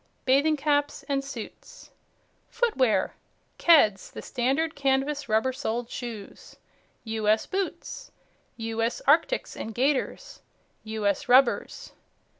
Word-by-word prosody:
Bathing 285 +4 +3
Caps 290 0 0
and 275 -1 0
Suits. 265 -5 -10 0.6
FOOTWEAR 350 - +1 0.5
Keds, 220 - +4
the - - -8
Standard 275 +6 0
Canvas 280 0 0
Rubber 220 +4 +2
Soled 240 -2 -3
Shoes. 230 -5 -8 0.5
"U.S." 220 -1 +1
Boots. 395 +5 -4 0.5
"U.S." 225 - -2
Arctics - - +2
and 220 -1 -6
Gaiters. 270 +2 -1 0.4
"U.S." 215 +3 -1
Rubbers. 255 0 +3
260 Hz, 95 wpm, -26 LUFS, 225-290 Hz, 0.6 s, Keds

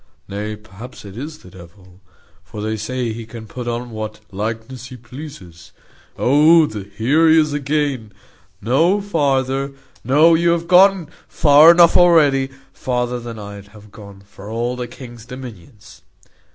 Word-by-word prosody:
Nay, 105 +2 -5
perhaps 105 +3 -13
it 100 -1 -11
is 150 +6 -7
the 90 - -17
devil 90 +1 -17 0.4
for 105 - -10
they 110 +1 -3
say 125 +1 -3
he 115 0 -9
can 115 -1 -10
put 120 +2 -8
on 120 0 -4
what 110 -1 -6
likeness 115 +5 -5
he 125 -1 -11
pleases. 120 - -12 0.4
Oh! 155 +4 +5
here 110 +10 0
he 160 - +5
is 150 -2 0
again. 145 -6 -2 0.5
No 160 - +2
farther! 140 -7 -1 0.3
No, 150 +7 +4
you 170 +1 +3
have 170 0 -3
gone 185 -1 +5 0.2
far 150 +1 +6
enough 170 0 +6
already; 145 -6 +4 0.2
farther 125 -1 -2
than 115 -1 -8
I'd 100 -1 -10
have 105 0 -17
gone 100 -2 -13
for 100 +1 -13
all 120 +2 -2
the 125 -1 -5
king's 120 -1 -12
dominions." 120 -4 -12
125 Hz, 150 wpm, -19 LUFS, 105-145 Hz, 0.5 s, far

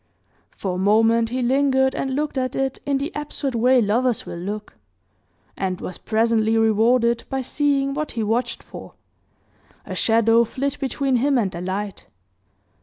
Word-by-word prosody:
For 190 -2 -4
a 180 - -3
moment 225 +3 +3
he 250 +1 -2
lingered 265 +1 +2
and 265 -1 -2
looked 300 +1 -2
at 255 -1 -2
it 270 -1 -1
in 280 -1 +2
the 285 +5 -3
absurd 295 -2 -4
way 250 +2 +4
lovers 235 +3 0
will 170 - -7
look, 205 +4 -6 0.8
and 185 -2 -2
was 180 - -7
presently 225 0 +1
rewarded 230 +2 +3
by 265 -1 -2
seeing 275 0 0
what 305 +1 -3
he 230 - -2
watched 235 +3 -1
for - - -11 0.9
a - - -6
shadow 230 +1 +3
flit 275 +5 -3
between 270 -1 0
him 275 +2 +2
and 205 -6 0
the 170 - -6
light. 195 +2 -4
235 Hz, 160 wpm, -22 LUFS, 220-270 Hz, 0.9 s, way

